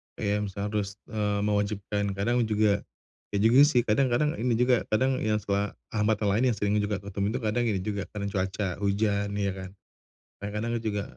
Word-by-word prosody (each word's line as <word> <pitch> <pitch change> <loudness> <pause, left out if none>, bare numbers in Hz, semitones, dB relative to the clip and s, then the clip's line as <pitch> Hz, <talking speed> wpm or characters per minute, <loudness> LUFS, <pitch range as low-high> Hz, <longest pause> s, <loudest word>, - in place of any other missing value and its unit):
Kayak 105 +1 -1
misal 100 +1 -4
harus, 100 -2 -2 0.2
eee, 105 -1 0
mewajibkan 100 -1 -1
kadang 115 +5 +1
juga 105 -1 +2 0.6
iya - - +2
juga 115 +4 +6
sih 125 -5 +3
kadang 120 +4 +2
kadang 140 +5 +2
ini 120 0 +1
juga 125 +1 +2
kadang 130 +4 +1
yang 110 0 +1
suka, 100 0 -1 0.2
hambatan 105 -1 +1
lain 110 +5 +2
yang - - -6
sering 105 +1 +1
juga 105 0 0
aku 100 - -7
temuin 100 +3 -1
tuh - - -3
kadang 120 +3 +1
ini 100 -4 0
juga 100 -2 -3
karena 100 -1 -3
cuaca, 95 -1 -2
hujan, 100 0 +1
iya 100 -1 0
kan. 95 0 -7 0.7
Kadang-kadang 105 +3 -3
juga 105 -2 -1
105 Hz, 190 wpm, -27 LUFS, 100-110 Hz, 0.7 s, juga